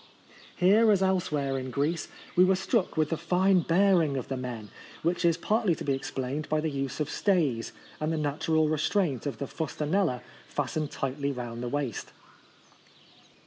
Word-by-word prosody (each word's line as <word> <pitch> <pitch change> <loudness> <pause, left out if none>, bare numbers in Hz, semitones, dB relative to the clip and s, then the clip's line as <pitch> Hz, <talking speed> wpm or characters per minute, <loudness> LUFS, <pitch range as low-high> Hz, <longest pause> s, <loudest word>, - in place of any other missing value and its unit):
Here, 210 +5 +5
as 195 -2 +3
elsewhere 150 -8 0
in 130 0 -5
Greece, 150 +6 -1 0.3
we 180 - +7
were 190 +1 +4
struck 190 -1 0
with 155 -1 +2
the 165 - 0
fine 180 +3 +3
bearing 170 -4 +3
of 130 - -5
the 135 - -1
men, 120 -5 -5 0.3
which 170 +2 0
is 170 -1 +3
partly 210 -1 +1
to - - -7
be 140 - +1
explained 135 +2 -3
by 155 - +2
the 155 0 -1
use 135 0 -3
of 150 - 0
stays 155 - +1 0.3
and 155 +1 -1
the 160 - 0
natural 155 +1 +1
restraint 155 - 0
of 135 -6 -3
the 140 - -3
fustaneUa 155 -2 -1 0.2
fastened 150 +1 -2
tightly 140 +1 -2
round 120 -3 -5
the 125 - -3
waist. 140 -4 -3
155 Hz, 170 wpm, -28 LUFS, 135-180 Hz, 0.3 s, we